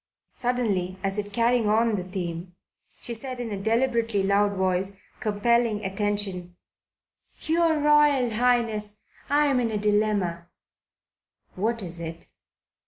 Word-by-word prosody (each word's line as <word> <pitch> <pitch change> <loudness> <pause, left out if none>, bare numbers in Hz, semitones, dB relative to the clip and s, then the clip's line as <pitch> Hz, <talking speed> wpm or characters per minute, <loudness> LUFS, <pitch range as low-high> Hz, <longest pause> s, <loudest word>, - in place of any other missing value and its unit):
Suddenly, 215 -7 -1
as 195 +1 -1
if 205 0 -5
carrying 230 0 +2
on 225 +1 +3
the 190 -3 -1
theme, 175 -1 -5 0.4
she 240 - -5
said 255 +2 -5
in 235 -2 -4
a 200 -1 -4
deliberately 230 -2 +1
loud 200 +1 +2
voice, 190 0 0 0.3
compelling 215 0 +1
attention: 195 -2 -2 0.9
"Your 325 0 +2
Royal 295 -4 +4
Highness, 220 -3 +1 0.3
I 295 +1 +3
am 275 -3 +2
in 235 -2 0
a 215 - -2
dilemma." 205 -5 0 1.1
"What 225 +3 -1
is 170 -1 -7
it?" 165 0 -7
210 Hz, 125 wpm, -25 LUFS, 195-240 Hz, 1.1 s, Royal